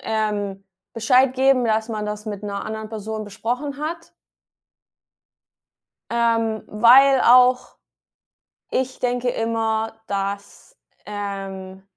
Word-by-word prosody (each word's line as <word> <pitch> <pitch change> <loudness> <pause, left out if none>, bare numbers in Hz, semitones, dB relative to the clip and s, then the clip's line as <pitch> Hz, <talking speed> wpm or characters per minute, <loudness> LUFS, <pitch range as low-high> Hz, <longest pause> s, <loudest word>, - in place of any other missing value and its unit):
ähm, 205 -3 -2 0.3
Bescheid 250 +3 +3
geben, 265 -1 +3
dass 220 0 0
man 215 -2 -4
das 210 +1 -6
mit 205 -1 -5
'ner 200 -1 -4
anderen 220 0 -6
Person 220 0 -5
besprochen 250 +8 -4
hat 330 +2 -6 2.0
ähm, 230 -2 0
weil 255 +5 +6
auch 250 +1 +4 0.9
ich 260 0 -2
denke 245 0 -1
immer, 225 -1 -1
dass, 200 - -5 0.3
ähm 195 -2 -6
220 Hz, 100 wpm, -22 LUFS, 210-250 Hz, 2.0 s, weil